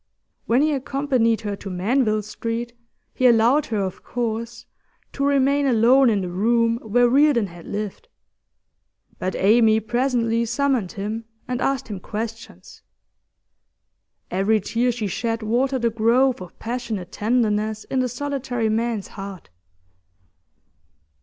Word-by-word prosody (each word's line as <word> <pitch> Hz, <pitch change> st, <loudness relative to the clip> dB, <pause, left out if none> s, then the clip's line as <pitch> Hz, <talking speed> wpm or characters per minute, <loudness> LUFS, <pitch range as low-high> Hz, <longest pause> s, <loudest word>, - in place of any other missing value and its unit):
When 245 Hz, +5 st, +3 dB
he 305 Hz, 0 st, +2 dB
accompanied 260 Hz, -4 st, 0 dB
her 205 Hz, -2 st, -3 dB
to 195 Hz, -, -8 dB
Manville 215 Hz, +4 st, +1 dB
Street, 230 Hz, +3 st, -4 dB, 0.4 s
he 255 Hz, -, +3 dB
allowed 240 Hz, +5 st, +4 dB
her, 210 Hz, -3 st, -1 dB
of 190 Hz, -2 st, -5 dB
course, 230 Hz, 0 st, -4 dB, 0.5 s
to 275 Hz, -, -2 dB
remain 280 Hz, 0 st, +2 dB
alone 250 Hz, +2 st, +5 dB
in 205 Hz, -3 st, +1 dB
the 180 Hz, -, -4 dB
room 230 Hz, +4 st, +2 dB
where 240 Hz, +3 st, +3 dB
Reardon 270 Hz, -3 st, +4 dB
had 175 Hz, -3 st, -12 dB
lived; 210 Hz, -, -5 dB, 1.1 s
but 185 Hz, 0 st, -2 dB
Amy 220 Hz, +2 st, +4 dB
presently 235 Hz, 0 st, 0 dB
summoned 240 Hz, -4 st, 0 dB
him, 215 Hz, +3 st, -4 dB, 0.2 s
and 250 Hz, 0 st, -3 dB
asked 270 Hz, -2 st, 0 dB
him 205 Hz, -3 st, -6 dB
questions. 220 Hz, -, -7 dB, 1.5 s
Every 195 Hz, +4 st, +2 dB
tear 235 Hz, +5 st, 0 dB
she 230 Hz, -2 st, -4 dB
shed 225 Hz, +3 st, -2 dB
watered 250 Hz, +3 st, 0 dB
a 230 Hz, -, +2 dB
growth 235 Hz, +2 st, +2 dB
of 180 Hz, -, -11 dB
passionate 225 Hz, -6 st, -4 dB
tenderness 215 Hz, -1 st, 0 dB
in 265 Hz, -, -2 dB
the 255 Hz, -1 st, 0 dB
solitary 250 Hz, -3 st, -2 dB
man's 225 Hz, -2 st, -1 dB
heart. 195 Hz, -, -9 dB
230 Hz, 130 wpm, -22 LUFS, 215-250 Hz, 1.5 s, alone